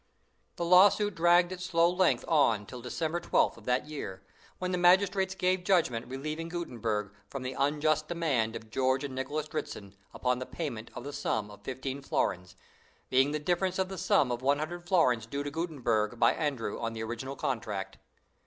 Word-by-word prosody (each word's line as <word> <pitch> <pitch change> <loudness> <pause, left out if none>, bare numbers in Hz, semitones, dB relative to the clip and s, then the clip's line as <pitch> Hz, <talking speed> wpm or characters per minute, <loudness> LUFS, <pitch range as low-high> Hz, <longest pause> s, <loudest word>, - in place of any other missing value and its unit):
The 170 - -2
lawsuit 200 +4 +6
dragged 175 +1 +4
its 180 -1 -6
slow 170 -2 +3
length 180 +1 +2
on 140 -9 +3
until 120 +4 -9
December 160 +7 -2
12th - - +2
of - - -15
that 125 +2 +1
year, 100 -11 -7 0.3
when 185 0 -3
the 180 - 0
magistrates 190 +1 +4
gave 185 -1 +1
judgment 160 -12 +1
relieving 155 +5 -4
Gutenberg 115 - -3 0.2
from 135 -2 -5
"the 130 +1 -3
unjust 150 +2 +1
demand 140 -10 0
of 110 -1 -9
George 130 +3 +1
and 140 -2 -4
Nicholas 145 +4 -3
Dritzhn, 100 -8 -6 0.2
upon 125 0 0
the 130 - -5
payment 120 -9 -5
of - - -6
the 145 +2 -6
sum 110 -7 -2
of 105 - -13
fifteen 130 +1 -5
florins, 90 -8 -1 0.6
being 130 +2 +4
the 150 - -1
difference 180 +4 0
of 190 -1 0
the 190 - -6
sum 125 - +3
of 120 0 -2
one 140 +2 +3
hundred 175 +3 -5
florins 125 - +3
due 140 +4 -3
to 145 - -4
Gutenberg 120 -9 -1
by 115 - +5
Andrew 140 -9 -2
on 115 -1 -3
the 110 0 -4
original 120 +4 -5
contract." 105 -8 -3
140 Hz, 185 wpm, -30 LUFS, 120-175 Hz, 0.6 s, lawsuit